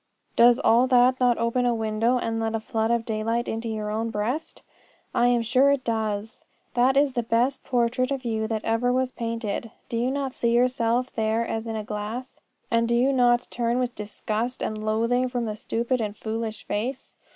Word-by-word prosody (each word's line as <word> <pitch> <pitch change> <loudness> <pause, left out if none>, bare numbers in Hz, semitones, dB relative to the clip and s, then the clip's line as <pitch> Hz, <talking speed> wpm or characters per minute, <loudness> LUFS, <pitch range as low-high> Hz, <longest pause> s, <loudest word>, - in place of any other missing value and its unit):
Does 240 0 +6
all 250 -2 +4
that 255 0 +4
not 245 -2 +3
open 235 +2 +1
a 240 - +2
window 225 +2 +1
and 225 -2 -2
let 225 0 -1
a - - 0
flood 220 0 -1
of 235 -1 +1
daylight 225 +2 -1
into 225 +1 -3
your 215 -1 -3
own 225 +2 -1
breast? 225 +9 -3 0.5
I 240 +1 +3
am 240 -1 +2
sure 255 +4 +4
it 280 -2 0
does. 220 -1 -2 0.3
That 255 +2 +3
is 280 -1 +3
the 240 - 0
best 235 +4 0
portrait 250 +1 +1
of 270 -2 -3
you 220 -1 -1
that 220 -1 -3
ever 230 +2 +1
was 255 0 0
painted. 230 -2 -3 0.2
Do 230 - -2
you 240 +2 +1
not 270 -1 -2
see 235 0 +1
yourself 245 0 +1
there 220 +1 0
as 225 +1 -3
in 225 - -3
a 215 - -3
glass? 215 +4 -5 0.3
And 230 0 +2
do 235 - +2
you 260 +3 +3
not 245 -1 +3
turn 235 0 0
with 250 -1 -1
disgust 215 +3 -4
and 215 0 -3
loathing 230 +4 +1
from 245 -1 -2
the 215 -1 -3
stupid 235 +3 -1
and 210 -1 -3
foolish 220 -1 -4
face? 250 +6 -3
235 Hz, 200 wpm, -25 LUFS, 220-250 Hz, 0.5 s, Does